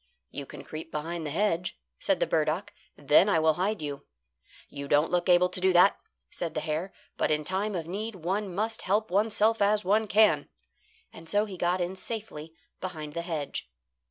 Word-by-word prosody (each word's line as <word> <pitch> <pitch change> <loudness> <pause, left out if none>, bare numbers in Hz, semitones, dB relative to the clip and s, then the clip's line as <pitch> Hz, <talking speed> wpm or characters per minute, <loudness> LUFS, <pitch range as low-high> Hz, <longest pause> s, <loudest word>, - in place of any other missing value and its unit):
"You 140 -1 -6
can - - -10
creep 155 +1 -8
behind 160 +1 -4
the - - -3
hedge," 180 +1 0 0.2
said - - +1
the - - +2
burdock, 160 +4 0 0.2
"then 150 +7 +5
I 195 - +3
will 160 0 +4
hide 190 +1 -1
you." 145 -1 -6 0.6
"You 140 0 -7
don't 145 +3 +3
look 175 0 +1
able 180 0 +6
to 180 - -1
do 190 0 +4
that," 180 +3 +6 0.4
said 170 - -5
the - - +1
hare, 155 +5 -2 0.3
"but - - +1
in 150 0 +1
time 195 +5 -2
of 165 -3 -3
need 205 +5 -4
one 190 +3 -2
must 220 +5 -2
help 210 +2 0
oneself 215 +2 +2
as 205 0 +3
one 215 +3 +2
can." 205 -9 +4 0.6
And 165 0 -12
so 205 +1 +2
he 200 -3 -8
got 180 +1 0
in 175 +2 -2
safely 185 -6 -6 0.2
behind 155 -5 -6
the 170 - -2
hedge. 160 - -4
180 Hz, 190 wpm, -28 LUFS, 155-205 Hz, 0.6 s, able